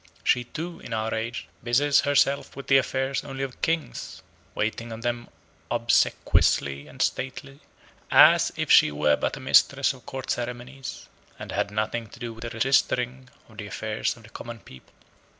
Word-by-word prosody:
She 125 0 +2
too, 165 +7 -6
in - - -8
our 110 0 -1
age, 115 +1 -4 0.2
busies 135 +4 +3
herself 140 -1 +2
with 140 - -8
the 135 - +5
affairs 135 +1 -1
only 135 -1 -5
of 135 -2 -7
kings; 165 -1 -2 0.3
waiting 110 +2 -2
on 110 0 -7
them 120 0 -3 0.4
obsequiously 70 0 +2
and - - -15
stately, 135 +2 -4 0.5
as - - +7
if - - -1
she - - +7
were 75 0 +2
but - - -2
a - - -8
mistress - - +4
of - - -17
court 130 -1 -4
ceremonies, 125 +2 -5 0.3
and - - -8
had - - -1
nothing 110 +2 -2
to 120 - -15
do 120 -2 -5
with 115 - -13
the 115 - -4
registering 125 +1 +1 0.2
of 110 -2 -15
the 105 - -5
affairs 110 +3 -2
of 115 - -16
the 110 - -15
common 115 -1 -9
people. 65 - -16
120 Hz, 170 wpm, -26 LUFS, 110-135 Hz, 0.5 s, as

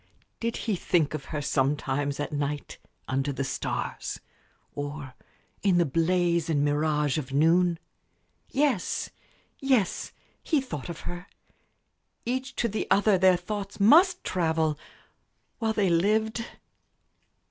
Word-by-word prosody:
Did 230 0 -2
he 220 -4 -1
think 165 -4 +1
of 155 -3 -5
her 150 -2 -4
sometimes, 140 0 0
at 145 - -3
night, 145 0 -3 0.3
under 135 +2 0
the 135 0 -2
stars, 135 - -3 0.5
or 145 -2 -5 0.5
in 190 -3 +3
the 175 - +4
blaze 170 +2 +1
and 145 -2 +2
mirage 150 0 +1
of 135 -3 -7
noon? 165 +4 +3 0.7
Yes, 275 -8 0 0.5
yes; 260 -9 +1 0.3
he 310 - +1
thought 170 - -6
of 170 - -6
her. 175 +2 -7 1.0
Each 260 +2 -2
to 235 - +1
the 215 0 -3
other 200 -1 +4
their 185 -1 +5
thoughts 200 +2 -5
must 345 - +6
travel 160 -3 +1 0.8
while 225 -2 0
they 200 -5 +2
lived. 220 +6 +1
170 Hz, 125 wpm, -27 LUFS, 145-210 Hz, 1.0 s, must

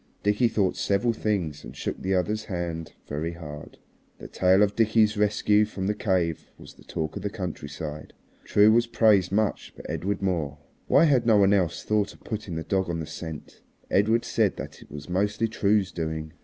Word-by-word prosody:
Dickie 105 +4 +3
thought 100 -5 0
several 105 +4 +1
things 95 -9 -2
and - - -10
shook - - -4
the 95 +1 0
other's 105 +4 -1
hand 85 -4 -4
very 80 +4 -3
hard. 75 -3 -9 0.4
The - - -9
tale 95 +8 +3
of 105 0 0
Dickie's 110 -1 +3
rescue 105 0 +3
from 100 -3 -4
the 105 - +1
cave 90 -6 -1
was - - -13
the - - -19
talk 80 -1 -4
of - - -5
the 100 - -2
countryside. 75 -6 -6 0.3
True 105 +1 +5
was 120 +1 +3
praised 105 -6 +3
much, 105 +1 -1
but - - -10
Edred 100 +1 -2
more. 80 -6 -1 0.3
Why - - +5
had 130 -7 +3
no 110 -2 +6
one 100 0 +5
else 90 -5 0
thought 105 -1 0
of - - -22
putting 105 -6 -5
the 80 - -3
dog 95 0 -1
on 85 -1 -2
the 80 - -4
scent? 80 -1 -8 0.3
Edred 110 +4 +3
said - - +1
that - - -8
it - - -15
was 75 0 -9
mostly 105 +5 0
True's 100 -3 +1
doing. 80 -2 -4
95 Hz, 195 wpm, -26 LUFS, 80-105 Hz, 0.4 s, no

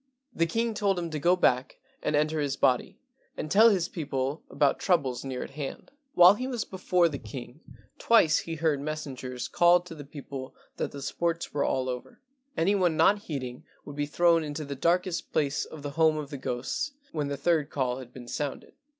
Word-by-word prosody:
The 165 - +1
king 230 +6 0
told 200 -3 +1
him 170 -2 -3
to 155 - -3
go 175 +5 +4
back 125 -7 +1 0.2
and 150 - 0
enter 155 +1 +1
his 140 -2 -1
body 125 -2 +1 0.4
and 155 - -5
tell 220 +3 +7
his 185 -5 +1
people 140 -3 -3
about 140 -2 +2
troubles 140 -10 +1
near 130 -2 -4
at - - -9
hand. 140 -2 -7 0.2
While 180 +2 +9
he 255 +5 -4
was 245 -4 -2
before 180 -2 +2
the 145 -4 -5
king 120 +4 -9 0.4
twice 170 -10 +5
he 165 - -5
heard 155 -3 +1
messengers 135 -4 -5
call 175 0 +5
to 175 -1 -10
the 150 -2 -9
people 140 -2 -8 0.2
that - - -2
the 140 -1 -7
sports 170 +3 -2
were 145 - +1
all 130 -1 0
over; 125 -1 -6 0.4
any 190 +5 +3
one 180 -5 +2
not 205 +1 +5
heeding 130 -5 -5 0.2
would 145 - -8
be 145 0 -1
thrown 170 +2 +3
into 150 0 -5
the 140 - -5
darkest 175 +4 0
place 145 -1 0
of 155 -2 -11
the 145 - -4
home 160 +1 +3
of 150 -1 -5
the 140 - -4
ghosts 125 - -3 0.2
when 150 -3 -2
the 140 0 -3
third 155 0 +1
call 130 -2 -1
had 125 -2 -10
been 125 -1 -11
sounded. 145 +2 -4
150 Hz, 200 wpm, -28 LUFS, 135-175 Hz, 0.4 s, While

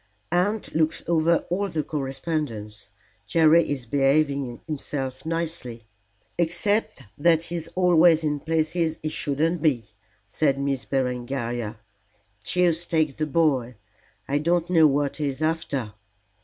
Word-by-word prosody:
"Aunt 200 +5 0
looks 160 0 +1
over 170 0 +2
all 200 +3 0
the 160 -3 -2
correspondence. 135 -8 -4 0.4
Jerry 165 0 +4
is 135 -4 -3
behaving 140 -1 +1
himself 135 -2 -5
nicely." 160 -8 -3 0.6
"Except 175 0 0 0.2
that 165 +1 +4
he's 170 -1 -4
always 175 -3 +5
in 150 -1 0
places 160 +1 0
he 155 - -1
shouldn't 155 +2 -1
be," 120 -9 +1 0.3
said 140 +6 +1
Miss 140 -2 -1
Berengaria. 120 -3 -2 0.7
"Deuce 175 +1 +1
take 155 -4 +1
the 155 0 -1
boy, 135 -6 +1 0.5
I 145 +1 +1
don't 170 +2 0
know 160 -3 +6
what 140 0 0
he 150 -1 -1
is 135 0 -4
after." 145 -9 -2
155 Hz, 125 wpm, -25 LUFS, 135-165 Hz, 0.7 s, know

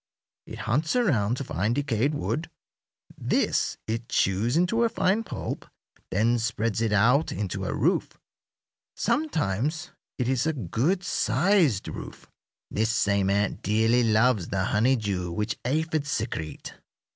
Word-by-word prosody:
It - - -8
hunts 155 - +1
around 125 - +2
to 140 - -3
find 105 +1 -1
decayed 140 0 0
wood. 155 +2 -2 0.7
This - - 0
it 115 +1 -4
chews 105 +9 +1
into 185 +7 +2
a 230 - +3
fine 220 0 +1
pulp, - - -5 0.4
then 115 +5 +2
spreads 110 -1 -1
it 115 -2 +1
out 120 +9 +3
into 100 -1 -3
a - - -2
roof; - - 0 0.8
sometimes 155 - -1 0.3
it 125 - -1
is 130 +3 +1
a 160 - +1
good 140 - -1
sized 175 - +2
roof. - - -8 0.4
This 110 +1 0
same 100 -3 +1
ant 100 +1 0
dearly 115 +4 +2
loves 110 -3 +3
the 95 -1 -1
honeydew 105 -5 +1
which 105 +4 -2
aphids 155 +2 0
secrete. 105 - -4
115 Hz, 135 wpm, -26 LUFS, 105-150 Hz, 0.8 s, a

